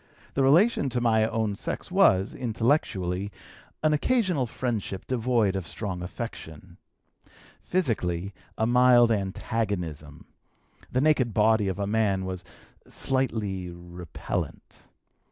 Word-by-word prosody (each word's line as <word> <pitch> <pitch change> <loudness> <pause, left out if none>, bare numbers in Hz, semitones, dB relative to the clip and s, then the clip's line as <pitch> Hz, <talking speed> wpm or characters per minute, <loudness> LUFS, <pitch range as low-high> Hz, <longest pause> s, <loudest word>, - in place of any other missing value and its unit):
The 135 - +1
relation 155 - +4
to 125 - -1
my 110 -2 +3
own 110 -3 -1
sex - - -5
was, 95 +1 +4
intellectually, 110 - 0 0.5
an 155 0 +4
occasional 180 - +1
friendship 110 -6 -3
devoid 120 -5 +1
of 95 -3 -3
strong 95 -5 -5
affection; 90 -5 -8 0.8
physically, 100 - -1 0.2
a 110 - +1
mild 120 0 +5
antagonism, 95 -7 -3 0.7
the 130 - +1
naked 135 -7 +2
body 110 -1 +3
of 95 -1 -2
a 100 - -1
man 100 -3 +1
was 90 -1 -5 0.4
slightly 105 -9 -2
repellant. 85 -1 -6
110 Hz, 110 wpm, -27 LUFS, 95-125 Hz, 0.8 s, mild